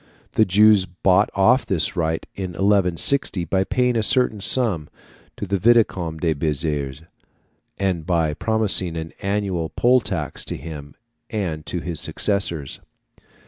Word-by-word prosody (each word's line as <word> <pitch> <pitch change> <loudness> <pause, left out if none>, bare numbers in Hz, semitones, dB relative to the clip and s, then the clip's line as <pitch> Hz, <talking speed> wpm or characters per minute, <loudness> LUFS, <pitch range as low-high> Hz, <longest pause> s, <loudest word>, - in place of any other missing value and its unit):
The 110 - +3
Jews 105 0 +4
bought 95 +4 +2
off 115 +7 +4
this 95 -1 -1
right 80 -2 -1
in 95 -2 -5
1160 95 - +1
by 95 +3 +1
paying 125 +4 0
a 115 - +2
certain 110 -1 +1
sum 100 - +2 0.5
to - - -4
the 100 0 -1
Vicomte 95 -7 +2
de 80 -2 +1
Béziers, 75 -1 -3 0.7
and 95 -4 -1
by 80 -3 0
promising 100 -4 +1
an 80 0 -6
annual 100 -5 -2
poll 125 +1 +3
tax - - -3
to - - -5
him 70 -1 -9 0.3
and 85 -8 -4
to 90 - -2
his 85 -3 -5
successors. 85 -9 -1
95 Hz, 140 wpm, -21 LUFS, 80-105 Hz, 0.7 s, Jews